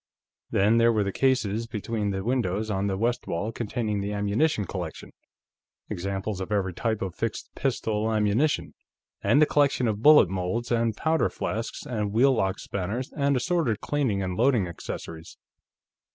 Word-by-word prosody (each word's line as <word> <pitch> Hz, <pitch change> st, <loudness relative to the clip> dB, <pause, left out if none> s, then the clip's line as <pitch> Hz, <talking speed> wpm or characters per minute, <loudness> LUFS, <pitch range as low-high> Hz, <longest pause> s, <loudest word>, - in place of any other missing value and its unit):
Then, 105 Hz, +4 st, +3 dB
there 115 Hz, 0 st, +5 dB
were 110 Hz, -2 st, +1 dB
the 100 Hz, -, -2 dB
cases 115 Hz, -3 st, +1 dB
between 110 Hz, -1 st, -3 dB
the 95 Hz, -1 st, -2 dB
windows 110 Hz, -3 st, -1 dB
on 100 Hz, 0 st, 0 dB
the 95 Hz, -1 st, -1 dB
west 120 Hz, +4 st, -1 dB
wall, 105 Hz, +7 st, -2 dB
containing 110 Hz, -2 st, -2 dB
the 100 Hz, +1 st, -3 dB
ammunition 105 Hz, +4 st, +1 dB
collection 90 Hz, -3 st, -6 dB, 0.8 s
examples 95 Hz, +2 st, -3 dB
of 95 Hz, -, -5 dB
every 95 Hz, -3 st, 0 dB
type 110 Hz, +2 st, -1 dB
of 95 Hz, -3 st, -4 dB
fixed 115 Hz, +4 st, -4 dB
pistol 110 Hz, -4 st, -1 dB
ammunition 110 Hz, +7 st, +1 dB, 0.5 s
and 115 Hz, +8 st, +3 dB
the 155 Hz, -, +7 dB
collection 140 Hz, -4 st, +2 dB
of 105 Hz, -1 st, -1 dB
bullet 150 Hz, -6 st, +8 dB
molds 95 Hz, +7 st, -3 dB
and 115 Hz, -2 st, +1 dB
powder 160 Hz, 0 st, +1 dB
flasks 115 Hz, +6 st, -4 dB
and 105 Hz, -7 st, -2 dB
wheel 130 Hz, +4 st, +5 dB
lock 95 Hz, -5 st, 0 dB
spanners 100 Hz, +7 st, -4 dB
and 140 Hz, -1 st, +2 dB
assorted 130 Hz, -, 0 dB
cleaning 125 Hz, -10 st, 0 dB
and 90 Hz, -1 st, -3 dB
loading 120 Hz, -6 st, +3 dB
accessories. 85 Hz, -1 st, -8 dB
110 Hz, 160 wpm, -26 LUFS, 100-120 Hz, 0.8 s, bullet